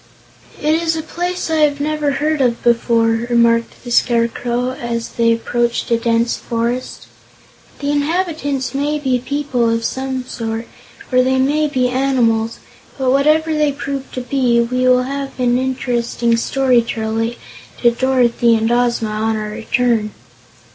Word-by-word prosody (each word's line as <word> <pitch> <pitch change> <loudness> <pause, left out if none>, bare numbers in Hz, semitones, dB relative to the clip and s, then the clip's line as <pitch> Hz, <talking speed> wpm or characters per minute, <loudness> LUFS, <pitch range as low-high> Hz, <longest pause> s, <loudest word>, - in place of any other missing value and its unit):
"It 305 +1 +1
is 325 0 +1
a 315 - -3
place 350 +1 -3
I 320 - +2
have 295 -2 +2
never 300 -1 0
heard 300 +1 0
of 240 -2 +1
before," 230 -1 +2
remarked 235 -1 +2
the 240 - -7
Scarecrow, 240 +1 +1
as 235 -2 -4
they 230 -1 +2
approached 235 +1 -1
a 230 - +4
dense 230 0 +1
forest. 235 +2 -3 0.8
"The 285 0 0
inhabitants 290 -3 -1
may 290 +2 0
be 260 -4 0
people, 255 -2 -1
of 230 0 0
some 260 -1 -3
sort, 225 -2 -4 0.4
or 255 0 +5
they 260 +1 +1
may 295 +4 +2
be 255 -3 +1
animals, 245 -4 +1 0.4
but 260 -2 +1
whatever 305 +4 +3
they 300 -1 +2
prove 275 -1 -5
to 255 - -3
be, 250 -2 +1
we 250 +2 +1
will 250 0 +4
have 275 +1 -5
an 245 0 +2
interesting 240 -2 0
story 255 +1 +2
to 230 -1 -5
relate 225 +2 -2 0.5
to 240 - +6
Dorothy 240 -2 +2
and 225 +1 0
Ozma 240 -2 +1
on 220 +1 -1
our 215 0 -4
return." 225 0 0
250 Hz, 155 wpm, -18 LUFS, 235-280 Hz, 0.8 s, to